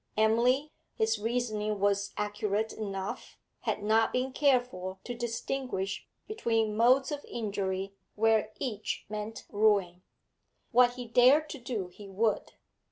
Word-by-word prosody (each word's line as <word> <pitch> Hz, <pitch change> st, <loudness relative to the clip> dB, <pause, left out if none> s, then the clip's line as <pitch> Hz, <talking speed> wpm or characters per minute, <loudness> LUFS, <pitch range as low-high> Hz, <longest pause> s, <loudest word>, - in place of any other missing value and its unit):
Emily 240 Hz, +7 st, +3 dB, 0.2 s
his 220 Hz, 0 st, +1 dB
reasoning 215 Hz, -2 st, -1 dB
was 200 Hz, 0 st, +1 dB
accurate 210 Hz, +1 st, -1 dB
enough 195 Hz, -3 st, -5 dB, 0.2 s
had 205 Hz, -, -2 dB
not 220 Hz, +1 st, +3 dB
been 255 Hz, +1 st, -1 dB
careful 245 Hz, -10 st, +1 dB
to 245 Hz, -, -5 dB
distinguish 235 Hz, -3 st, -3 dB, 0.2 s
between 225 Hz, -, 0 dB
modes 255 Hz, +5 st, +4 dB
of 290 Hz, -1 st, -4 dB
injury, 195 Hz, -3 st, -3 dB, 0.2 s
where 220 Hz, 0 st, +3 dB
each 220 Hz, -6 st, -3 dB
meant 215 Hz, +1 st, -5 dB
ruin. 200 Hz, -4 st, +2 dB, 0.7 s
What 245 Hz, 0 st, +5 dB
he 250 Hz, -1 st, -6 dB
dared 255 Hz, +6 st, +5 dB
to 285 Hz, -, -7 dB
do, 230 Hz, -7 st, -4 dB
he 200 Hz, +2 st, -12 dB
would. 215 Hz, +3 st, 0 dB
220 Hz, 125 wpm, -30 LUFS, 205-245 Hz, 0.7 s, What